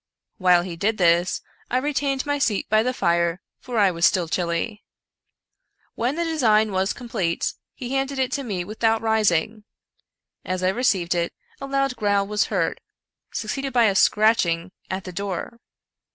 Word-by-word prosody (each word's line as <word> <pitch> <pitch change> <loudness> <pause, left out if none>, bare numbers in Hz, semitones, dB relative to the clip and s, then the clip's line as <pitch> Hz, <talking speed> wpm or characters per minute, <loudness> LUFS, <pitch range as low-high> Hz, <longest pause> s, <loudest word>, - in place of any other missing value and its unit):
While 180 -2 +5
he 175 -2 -6
did 215 +6 0
this, 175 0 +3 0.3
I 250 - +1
retained 275 0 -1
my 290 0 -1
seat 215 -7 0
by 215 0 +5
the 250 +3 0
fire, 170 -6 +1 0.2
for 245 -2 -5
I 200 -3 +4
was 170 -1 -5
still 175 -1 +4
chilly. 175 +6 -2 1.1
When 245 +5 -1
the 340 - -1
design 220 -10 +2
was 190 +1 0
complete, 190 -9 -2 0.2
he 250 -1 -6
handed 270 0 -1
it 260 -1 0
to 280 - -2
me 195 -7 -3
without 220 +3 0
rising. 215 -2 +1 0.8
As 185 0 -3
I 185 - +3
received 190 -6 +1
it, 170 -1 -1 0.3
a 275 - -6
loud 275 -1 0
growl 205 -2 +1
was 210 0 +1
heard, - - -1 0.5
succeeded 270 +5 -3
by 240 -2 +4
a 205 - +3
scratch 215 +3 +4
ing 170 +2 -2 0.2
at 190 0 -3
the 185 - -7
door. 200 +5 -4
210 Hz, 165 wpm, -23 LUFS, 180-250 Hz, 1.1 s, While